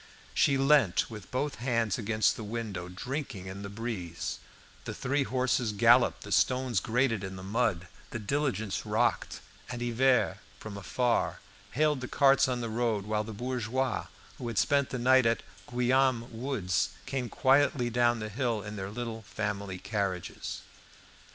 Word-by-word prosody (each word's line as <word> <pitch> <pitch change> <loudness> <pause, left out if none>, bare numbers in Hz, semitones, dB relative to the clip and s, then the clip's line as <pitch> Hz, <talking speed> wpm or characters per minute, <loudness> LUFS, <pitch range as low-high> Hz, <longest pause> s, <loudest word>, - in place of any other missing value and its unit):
She 140 - +3
leant 135 -8 +3
with 105 -4 -9
both 140 +3 -2
hands 115 -4 +1
against 110 0 +2
the 110 - -6
window, 105 -5 -4
drinking 125 +1 -5
in 95 +1 -7
the 100 - -6
breeze; 100 -5 -4 0.5
the - - -5
three 140 +3 0
horses 125 -3 0
galloped, 120 +4 +4
the 105 - -9
stones 125 -4 +2
grated 115 -1 +1
in 95 0 -5
the 95 - -8
mud, 100 -4 0 0.2
the - - -4
diligence 110 -3 -1
rocked, - - 0 0.3
and 120 -1 -4
Hivert, 125 +2 +2 0.2
from 110 -2 -7
afar, 120 +5 0 0.3
hailed 150 0 +2
the 130 - -4
carts 135 0 +4
on 125 -1 -1
the 115 - -2
road, 110 -3 0
while 105 0 0
the 110 - -7
bourgeois 125 +2 -2 0.3
who 120 - -4
had 115 -3 -4
spent 140 -2 +3
the 125 - -3
night 130 0 +5
at 115 - +1 0.2
the - - -15
Guillaume 125 -1 +2
woods 115 -6 -1 0.2
came 130 -3 -3
quietly 135 -2 +3
down 120 0 +3
the 110 -1 -4
hill 115 -2 -1
in 105 0 -7
their 95 0 -4
little 115 +1 -5
family 100 -3 -4
carriages. 100 -3 -3
115 Hz, 160 wpm, -30 LUFS, 105-130 Hz, 0.5 s, night